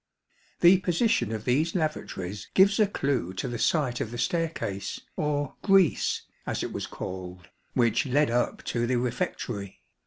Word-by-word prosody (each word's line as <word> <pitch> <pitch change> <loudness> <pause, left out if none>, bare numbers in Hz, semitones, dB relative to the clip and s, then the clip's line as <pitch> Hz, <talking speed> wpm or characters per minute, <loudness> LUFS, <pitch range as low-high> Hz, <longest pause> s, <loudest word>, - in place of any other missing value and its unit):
The 180 +2 +7
position 185 - +1
of 110 -1 -4
these 150 +8 +1
lavatories 105 - -3
gives 200 +2 +5
a 210 - +5
clue 135 - -1
to 95 - -3
the 120 -1 -4
site 130 -6 +1
of - - -2
the 120 - -6
staircase, 160 - -2
or 145 -2 -1
" - - -41
grease," 195 -5 +3 0.2
as - - -1
it - - -4
was - - -4
called, 90 -1 -7 0.3
which 120 +1 +2
led 140 0 +2
up 120 +1 0
to 120 0 0
the 130 - +1
refectory. 120 - -3
130 Hz, 160 wpm, -27 LUFS, 110-165 Hz, 0.3 s, The